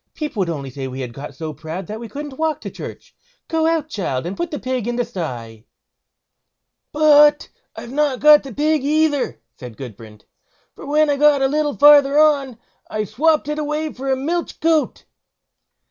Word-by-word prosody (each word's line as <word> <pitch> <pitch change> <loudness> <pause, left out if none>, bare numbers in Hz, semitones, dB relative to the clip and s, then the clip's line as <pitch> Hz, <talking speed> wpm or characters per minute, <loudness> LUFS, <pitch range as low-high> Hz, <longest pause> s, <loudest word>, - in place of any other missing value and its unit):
People 300 -8 -5
would 185 -3 0
only 140 -5 -5
say 135 0 -6
we 130 +1 -6
had 125 -2 -6
got 140 +3 -9
so 160 -1 -6
proud 160 +5 -7
that 215 +5 -7
we 230 -1 -8
couldn't 285 +3 -8
walk 320 -1 0
to - - -7
church. - - -10 0.3
Go 320 -1 0
out, 325 -2 0
child, 170 - -3
and 180 +3 -4
put 345 - -2
up - - -17
the 295 - -4
pig 255 -3 -3
in 240 - -2
the 245 0 -1
sty." 120 - -7 1.3
"But 295 -1 +5 0.3
I've 235 - -9
not 285 -2 0
got 300 0 +7
the 270 - -10
pig 300 +2 0
either", 300 -1 0 0.2
said 125 -3 -10
Gudbrand; 110 -4 -11 0.5
"for - - -11
when 305 +1 +3
I 285 - 0
got 290 -1 +4
a - - +4
little 295 0 -1
farther 290 -1 +6
on, 285 -5 +3 0.3
I 215 0 -2
swopped 295 - +1
it 300 0 -3
away 300 +1 -3
for 270 +1 -4
a - - +3
milch 330 +6 -3
goat." 320 -1 0
275 Hz, 190 wpm, -20 LUFS, 180-300 Hz, 1.3 s, got